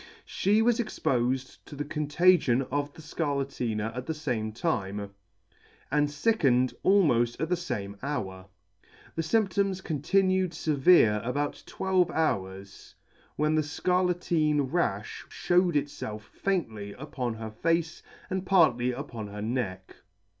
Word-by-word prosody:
She 210 Hz, +3 st, +2 dB
was 240 Hz, 0 st, +3 dB
expofed 130 Hz, -, -1 dB
to 145 Hz, -, -9 dB
the 145 Hz, +1 st, -4 dB
con 150 Hz, 0 st, -3 dB
tagion 150 Hz, -6 st, +4 dB
of 145 Hz, +1 st, -1 dB
the 160 Hz, -, -12 dB
Scarlatina 135 Hz, -8 st, -2 dB
at 125 Hz, 0 st, -5 dB
the 160 Hz, -, -2 dB
fame 120 Hz, -8 st, -2 dB
time, 100 Hz, -, -2 dB, 0.8 s
and 150 Hz, +1 st, +3 dB
fickened 140 Hz, -, +2 dB
almoft 125 Hz, -13 st, +3 dB
at 160 Hz, +2 st, -1 dB
the 180 Hz, -, +3 dB
fame 100 Hz, -, -4 dB
hour. 95 Hz, -10 st, -4 dB, 0.7 s
The 165 Hz, -, 0 dB
fymptoms 195 Hz, +1 st, +1 dB
continued 185 Hz, +4 st, +1 dB
fevere 145 Hz, -8 st, +4 dB
about 145 Hz, +4 st, -2 dB
twelve 185 Hz, -2 st, +1 dB
hours, 95 Hz, -, -3 dB, 0.4 s
when 150 Hz, +1 st, +1 dB
the 155 Hz, -, +3 dB
Scarlatine 165 Hz, -3 st, +1 dB
ralh 105 Hz, -, 0 dB, 0.2 s
fhewed 175 Hz, -1 st, +2 dB
itfelf 140 Hz, -7 st, -3 dB
faintly 110 Hz, -, -3 dB
upon 125 Hz, -3 st, -4 dB
her 110 Hz, -1 st, -6 dB
face, 165 Hz, +7 st, -1 dB, 0.3 s
and 190 Hz, -2 st, -2 dB
partly 155 Hz, -11 st, +3 dB
upon 120 Hz, -5 st, -6 dB
her 105 Hz, +1 st, -6 dB
neck. 105 Hz, -6 st, -3 dB
145 Hz, 125 wpm, -28 LUFS, 115-175 Hz, 0.8 s, tagion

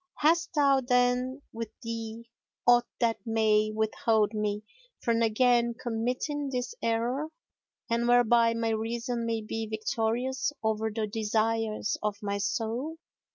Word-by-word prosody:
Hast 335 Hz, +3 st, +2 dB
thou 275 Hz, -2 st, +4 dB
then 250 Hz, +2 st, +1 dB
with 230 Hz, -1 st, -4 dB
thee 230 Hz, 0 st, -5 dB, 0.4 s
aught 240 Hz, 0 st, +5 dB
that 230 Hz, -2 st, +2 dB
may 215 Hz, -1 st, +2 dB
withhold 220 Hz, 0 st, +1 dB
me 210 Hz, -1 st, -1 dB, 0.4 s
from 230 Hz, -1 st, +1 dB
again 235 Hz, +1 st, +3 dB
committing 250 Hz, +5 st, -2 dB
this 250 Hz, -, -3 dB
error 240 Hz, +6 st, 0 dB, 0.6 s
and 235 Hz, +1 st, 0 dB
whereby 240 Hz, -1 st, +4 dB
my 230 Hz, 0 st, 0 dB
reason 230 Hz, +2 st, -2 dB
may 225 Hz, -1 st, -1 dB
be 225 Hz, +1 st, -4 dB
victorious 225 Hz, +5 st, -1 dB
over 220 Hz, 0 st, 0 dB
the 220 Hz, 0 st, -2 dB
desires 220 Hz, 0 st, 0 dB
of 210 Hz, -1 st, -1 dB
my 200 Hz, 0 st, -1 dB
soul?" 235 Hz, +9 st, -2 dB
230 Hz, 125 wpm, -29 LUFS, 220-245 Hz, 0.6 s, aught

